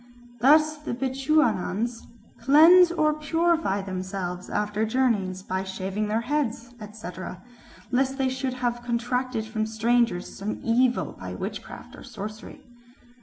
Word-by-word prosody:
Thus 305 Hz, +5 st, +5 dB
the 300 Hz, -5 st, -5 dB
Bechuanas 245 Hz, -4 st, 0 dB, 0.3 s
"cleanse 325 Hz, +8 st, +7 dB
or 310 Hz, -3 st, +2 dB
purify 310 Hz, -, 0 dB
themselves 185 Hz, -1 st, -5 dB
after 210 Hz, +1 st, -1 dB
journeys 215 Hz, -6 st, 0 dB
by 190 Hz, 0 st, -2 dB
shaving 190 Hz, +2 st, -3 dB
their 220 Hz, +2 st, 0 dB
heads, 245 Hz, -3 st, -2 dB
etc., 195 Hz, -4 st, -8 dB, 0.5 s
lest 265 Hz, +1 st, +1 dB
they 265 Hz, -2 st, +1 dB
should 260 Hz, 0 st, -2 dB
have 240 Hz, -1 st, -2 dB
contracted 240 Hz, 0 st, -2 dB
from 220 Hz, 0 st, -2 dB
strangers 225 Hz, -3 st, 0 dB
some 205 Hz, +2 st, -4 dB
evil 245 Hz, +2 st, +2 dB
by -, -, -6 dB
witchcraft -, -, -7 dB
or -, -, -12 dB
sorcery." 215 Hz, +2 st, -8 dB
235 Hz, 120 wpm, -25 LUFS, 210-265 Hz, 0.5 s, cleanse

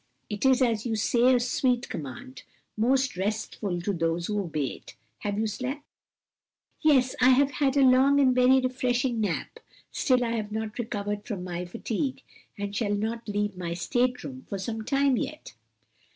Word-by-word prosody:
"It 210 Hz, +5 st, +1 dB
is, 260 Hz, 0 st, +4 dB
as 225 Hz, -3 st, +1 dB
you 230 Hz, -2 st, -1 dB
say, 240 Hz, +4 st, +3 dB
a -, -, +3 dB
sweet 245 Hz, 0 st, 0 dB
command, 130 Hz, -2 st, -7 dB, 0.3 s
most 255 Hz, +3 st, +2 dB
restful 200 Hz, -1 st, -2 dB
to 200 Hz, +3 st, -1 dB
those 165 Hz, 0 st, -1 dB
who 210 Hz, +1 st, -1 dB
obey 155 Hz, -6 st, -2 dB
it. -, -, -15 dB, 0.2 s
Have 205 Hz, -1 st, -3 dB
you 220 Hz, -, +1 dB
slept?" 255 Hz, +7 st, -4 dB, 1.0 s
"Yes, 265 Hz, -5 st, +4 dB
I 250 Hz, -, +7 dB
have 275 Hz, +2 st, +4 dB
had 275 Hz, 0 st, +1 dB
a 275 Hz, -, +5 dB
long 265 Hz, +2 st, +5 dB
and 260 Hz, -2 st, +5 dB
very 255 Hz, +1 st, +5 dB
refreshing 250 Hz, -1 st, 0 dB
nap; 195 Hz, -6 st, -3 dB, 0.3 s
still 255 Hz, -6 st, +2 dB
I 230 Hz, -, -1 dB
have 215 Hz, -2 st, -3 dB
not 220 Hz, +1 st, -4 dB
recovered 205 Hz, -2 st, -3 dB
from 200 Hz, -6 st, -4 dB
my 180 Hz, 0 st, -4 dB
fatigue, 235 Hz, -, -3 dB, 0.3 s
and 205 Hz, 0 st, -4 dB
shall 205 Hz, -2 st, 0 dB
not 225 Hz, +3 st, -3 dB
leave 205 Hz, -1 st, -1 dB
my 170 Hz, -2 st, -4 dB
state 250 Hz, +7 st, 0 dB
room 260 Hz, -1 st, -8 dB
for 200 Hz, -, -3 dB
some 220 Hz, +3 st, -4 dB
time 275 Hz, +1 st, +2 dB
yet." 305 Hz, +5 st, -5 dB
230 Hz, 175 wpm, -27 LUFS, 205-255 Hz, 1.0 s, I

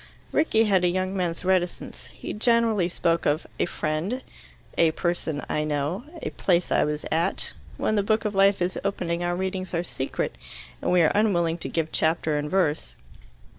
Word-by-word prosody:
Rickie 225 Hz, -8 st, +3 dB
had 195 Hz, -4 st, +3 dB
a -, -, +5 dB
young 185 Hz, +2 st, -1 dB
man's 180 Hz, -2 st, -2 dB
reticence. 185 Hz, -1 st, -1 dB
He -, -, -6 dB
generally 225 Hz, -5 st, +2 dB
spoke 170 Hz, -1 st, +1 dB
of 150 Hz, +3 st, +1 dB
"a -, -, +2 dB
friend," 170 Hz, +12 st, -2 dB, 0.5 s
"a 165 Hz, -, +5 dB
person 165 Hz, -4 st, -2 dB
I 150 Hz, -, 0 dB
know," 150 Hz, -, -2 dB, 0.2 s
"a -, -, -2 dB
place 175 Hz, -2 st, +1 dB
I -, -, +4 dB
was 150 Hz, 0 st, -2 dB
at." 165 Hz, +2 st, 0 dB, 0.2 s
When 215 Hz, -, +1 dB
the 205 Hz, -, +3 dB
book 215 Hz, +2 st, +1 dB
of 210 Hz, -, 0 dB
life 195 Hz, -1 st, +4 dB
is 180 Hz, +1 st, -2 dB
opening, 175 Hz, -3 st, -1 dB
our 175 Hz, 0 st, 0 dB
readings 185 Hz, 0 st, -3 dB
are 170 Hz, -, 0 dB
secret, 135 Hz, -6 st, -3 dB, 0.4 s
and -, -, 0 dB
we 180 Hz, -1 st, +5 dB
are 155 Hz, -, +4 dB
unwilling 175 Hz, -6 st, +2 dB
to -, -, -5 dB
give 160 Hz, -1 st, -1 dB
chapter 160 Hz, -1 st, +1 dB
and 150 Hz, 0 st, -3 dB
verse. 160 Hz, -5 st, 0 dB
175 Hz, 180 wpm, -25 LUFS, 165-195 Hz, 0.5 s, a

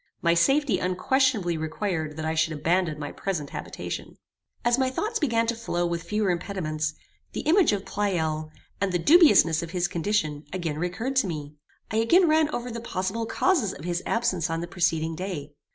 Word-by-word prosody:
My 170 Hz, -1 st, +4 dB
safety 270 Hz, -, +3 dB
unquestionably 185 Hz, -1 st, +1 dB
required 160 Hz, -1 st, -3 dB
that 160 Hz, -, -3 dB
I 160 Hz, -, 0 dB
should 160 Hz, 0 st, +1 dB
abandon 165 Hz, +1 st, 0 dB
my 145 Hz, -1 st, -5 dB
present 170 Hz, -7 st, -4 dB
habitation. -, -, -6 dB, 0.5 s
As 240 Hz, +2 st, +3 dB
my 260 Hz, -1 st, +2 dB
thoughts 430 Hz, -, -2 dB
began 230 Hz, -6 st, +2 dB
to 235 Hz, +1 st, -1 dB
flow 175 Hz, -6 st, -2 dB
with 170 Hz, -1 st, -2 dB
fewer 210 Hz, +1 st, 0 dB
impediments, 155 Hz, -4 st, -2 dB, 0.4 s
the -, -, -3 dB
image 340 Hz, -, +4 dB
of 205 Hz, -1 st, -2 dB
Pleyel, 160 Hz, -6 st, -1 dB, 0.3 s
and 200 Hz, -1 st, +1 dB
the 180 Hz, -, +2 dB
dubiousness 230 Hz, -, +6 dB
of 170 Hz, -, -6 dB
his 175 Hz, 0 st, 0 dB
condition, 160 Hz, -5 st, -1 dB
again 165 Hz, -5 st, -3 dB
recurred 200 Hz, +10 st, -2 dB
to 235 Hz, -, +3 dB
me. 150 Hz, -4 st, -5 dB, 0.4 s
I 220 Hz, -, 0 dB
again 335 Hz, +12 st, +5 dB
ran 310 Hz, -1 st, +3 dB
over 245 Hz, -4 st, -4 dB
the 230 Hz, 0 st, -5 dB
possible 220 Hz, +1 st, -3 dB
causes 265 Hz, -, +1 dB
of 150 Hz, -, -10 dB
his 175 Hz, 0 st, -1 dB
absence 210 Hz, -9 st, 0 dB
on 165 Hz, 0 st, -1 dB
the 170 Hz, -, -4 dB
preceding 165 Hz, -3 st, 0 dB
day. 160 Hz, -6 st, -5 dB
180 Hz, 185 wpm, -26 LUFS, 160-230 Hz, 0.5 s, dubiousness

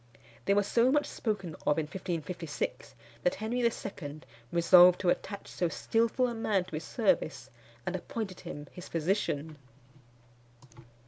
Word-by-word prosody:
They 200 Hz, -, +3 dB
were 205 Hz, -, +4 dB
so 235 Hz, +5 st, +3 dB
much 295 Hz, +1 st, +3 dB
spoken 200 Hz, -7 st, -3 dB
of 150 Hz, -, +4 dB
in 160 Hz, -, +1 dB
1556, 170 Hz, -3 st, -4 dB, 0.3 s
that 180 Hz, -, +2 dB
Henry 220 Hz, +4 st, -2 dB
II. 175 Hz, -10 st, -2 dB, 0.3 s
resolved 175 Hz, +1 st, +7 dB
to 180 Hz, -, +2 dB
attach 200 Hz, +2 st, -4 dB
so 175 Hz, -, -1 dB
skilful 230 Hz, -, +1 dB
a 240 Hz, -, -3 dB
man 215 Hz, -4 st, +1 dB
to 185 Hz, -, -14 dB
his 160 Hz, -, -6 dB
service, 140 Hz, -, 0 dB, 0.3 s
and 180 Hz, -, -2 dB
appointed 190 Hz, +1 st, -5 dB
him 145 Hz, -, -7 dB
his 180 Hz, -, -9 dB
physician. 160 Hz, -3 st, -1 dB
185 Hz, 140 wpm, -30 LUFS, 160-220 Hz, 0.3 s, resolved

